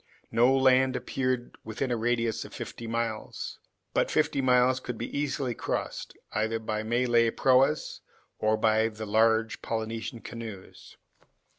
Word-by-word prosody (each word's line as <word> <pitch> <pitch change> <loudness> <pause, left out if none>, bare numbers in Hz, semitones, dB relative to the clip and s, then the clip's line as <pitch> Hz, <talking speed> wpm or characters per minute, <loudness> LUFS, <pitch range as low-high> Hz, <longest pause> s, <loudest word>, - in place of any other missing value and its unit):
No 120 +4 +4
land 130 0 +4
appeared 130 -2 -2
within 110 +4 -3
a - - +2
radius 115 -1 0
of - - -11
fifty 115 - -7
miles. 115 -1 -3 0.3
But - - +2
fifty 155 -3 +1
miles 125 0 +4
could 125 -3 -6
be 120 - -5
easily 140 -3 -1
crossed, - - -4
either 110 +1 0
by 110 -1 -3
Malay 120 +1 +2
proas 135 +5 +2 0.4
or 110 0 +2
by 110 0 +3
the 110 0 -6
large 110 +1 +2
Polynesian 115 +1 -4
canoes. 110 -5 -9
115 Hz, 135 wpm, -28 LUFS, 110-130 Hz, 0.4 s, No